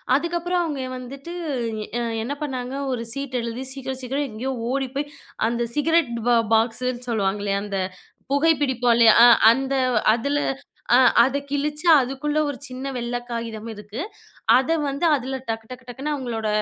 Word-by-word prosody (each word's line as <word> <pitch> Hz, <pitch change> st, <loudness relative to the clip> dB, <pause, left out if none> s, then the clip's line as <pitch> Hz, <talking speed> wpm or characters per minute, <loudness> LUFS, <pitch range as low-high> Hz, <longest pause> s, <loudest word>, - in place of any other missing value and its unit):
அதுக்கப்புறம் 345 Hz, +3 st, 0 dB
அவங்க 295 Hz, -5 st, -3 dB, 0.2 s
வந்துட்டு 275 Hz, +6 st, -8 dB, 0.7 s
எ -, -, -1 dB, 0.2 s
என்ன 260 Hz, +5 st, -3 dB
பண்ணாங்க? 260 Hz, -3 st, -4 dB, 0.2 s
ஒரு 240 Hz, -2 st, -2 dB
சீட் 275 Hz, -2 st, -4 dB
எழுதி 235 Hz, +2 st, -4 dB
சீக்கிரம், 265 Hz, -1 st, -5 dB
சீக்கிரம் 275 Hz, +3 st, -2 dB
எங்கயோ 240 Hz, +5 st, -4 dB, 0.2 s
ஓடிப்போய், 275 Hz, +2 st, -2 dB, 0.4 s
அந்த 235 Hz, +1 st, -1 dB
சிகரெட் 320 Hz, -2 st, +2 dB, 0.2 s
பா 240 Hz, -, +5 dB, 0.2 s
பாக்ஸுன்னு 240 Hz, +2 st, 0 dB
சொல்லுவாங்களே? 200 Hz, -2 st, 0 dB
அந்த 200 Hz, -1 st, -4 dB, 0.5 s
புகை 300 Hz, +4 st, +4 dB
பிடிப்போம் 250 Hz, -3 st, +2 dB
இல்லையா? 230 Hz, -2 st, +7 dB
அ -, -, +9 dB, 0.2 s
அந்த 270 Hz, +3 st, 0 dB, 0.4 s
அதுல 280 Hz, +5 st, -1 dB, 0.6 s
அ -, -, +7 dB, 0.3 s
அத 270 Hz, +3 st, +1 dB
கிழிச்சு 295 Hz, +3 st, -2 dB, 0.2 s
அதுக்குள்ள 275 Hz, +4 st, -2 dB
ஒரு 280 Hz, -, -5 dB
சின்ன 255 Hz, +1 st, -7 dB
வெள்ள 240 Hz, 0 st, -3 dB
காகிதம் 230 Hz, -1 st, -5 dB
இருக்கு. 210 Hz, +3 st, -9 dB, 0.6 s
அத 260 Hz, +2 st, -1 dB, 0.2 s
வந்து 280 Hz, +4 st, -2 dB
அதுல 265 Hz, -1 st, -2 dB
டக்கு, 225 Hz, 0 st, -3 dB
டக்கு, 255 Hz, 0 st, -10 dB
டக்குன்னு 270 Hz, +5 st, -4 dB
அவங்களோட 235 Hz, -5 st, -3 dB
255 Hz, 150 wpm, -23 LUFS, 235-280 Hz, 0.7 s, அ